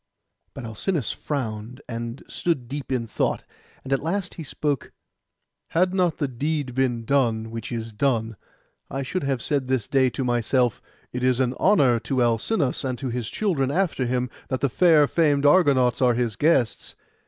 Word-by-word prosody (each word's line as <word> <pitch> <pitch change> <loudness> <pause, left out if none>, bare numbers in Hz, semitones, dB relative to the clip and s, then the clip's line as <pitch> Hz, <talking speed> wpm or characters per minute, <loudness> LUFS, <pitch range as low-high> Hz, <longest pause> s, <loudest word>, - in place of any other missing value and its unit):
But 135 - -7
Alcinous 125 - -2
frowned, 120 -3 -4
and 115 +1 -5
stood 150 -9 -2
deep 140 +1 -6
in 125 -3 0
thought; 110 - -1 0.4
and 135 - -2
at 135 - +1
last 185 +5 -2
he 165 - -7
spoke— 145 -1 -2 0.8
'Had 180 +2 +1
not 180 -3 +1
the 145 - 0
deed 140 +1 -2
been 120 -3 0
done 115 -4 +1
which 115 +1 -6
is 115 -1 -4
done, 115 -2 0 0.5
I 135 +1 -3
should 185 +8 -2
have 135 -3 -1
said 140 -3 0
this 130 -5 0
day 130 -2 +3
to 130 - -3
myself, 120 0 +1 0.3
"It 125 0 -3
is 130 -1 +2
an 130 -1 +1
honour 140 - +4
to 130 +1 0
Alcinous, 125 - 0
and 130 -2 -2
to 130 0 -4
his 120 -2 -3
children 165 -11 0
after 160 -5 0
him, 125 0 -1 0.2
that 130 -1 -2
the 140 - +2
far 160 +1 +5
famed 145 -2 +2
Argonauts 140 -6 +4
are 125 -2 +4
his 120 -3 -1
guests." 135 -4 +1
130 Hz, 175 wpm, -24 LUFS, 120-145 Hz, 0.8 s, far